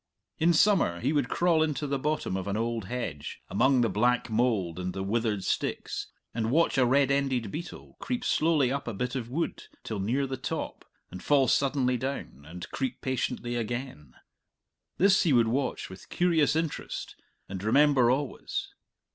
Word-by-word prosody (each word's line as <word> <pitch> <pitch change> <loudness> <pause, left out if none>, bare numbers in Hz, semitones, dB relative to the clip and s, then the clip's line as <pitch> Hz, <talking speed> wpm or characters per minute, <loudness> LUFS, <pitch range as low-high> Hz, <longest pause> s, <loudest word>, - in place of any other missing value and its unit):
In 165 +2 +4
summer 170 - +3
he 135 - 0
would 145 -4 +1
crawl 170 -2 +2
into 155 -1 0
the 140 -1 -1
bottom 150 -8 -1
of 95 +1 -3
an 100 +1 -1
old 115 -2 -2
hedge, 90 - -5
among 130 +5 +3
the 120 - +3
black 120 +4 +1
mould 110 -7 +1
and 90 0 -3
the 95 - -2
withered 105 -1 0
sticks, - - -2 0.3
and 115 -1 -1
watch 165 +6 +3
a 125 - +4
red 140 +2 +3
ended 130 -6 0
beetle 170 +3 -8
creep 250 -2 -3
slowly 150 -5 +2
up 140 -1 -3
a 115 - -3
bit 125 +4 -2
of 120 -3 -4
wood 165 +6 -3 0.2
till 110 -3 -4
near 125 +8 0
the 135 0 -4
top, - - -5 0.3
and 90 0 -8
fall 140 -3 +3
suddenly 130 -1 +2
down, 125 - -5
and 90 +2 -8
creep 130 -2 -3
patiently 125 -2 -2
again 120 - -5 0.8
this 195 +1 +5
he 165 -7 +3
would 120 -2 +4
watch 130 +2 -1
with 95 0 -12
curious 165 -5 +2
interest 160 -1 -3 0.3
and 95 0 -6
remember 135 +2 +4
always. 145 - -2
125 Hz, 170 wpm, -28 LUFS, 110-145 Hz, 0.8 s, this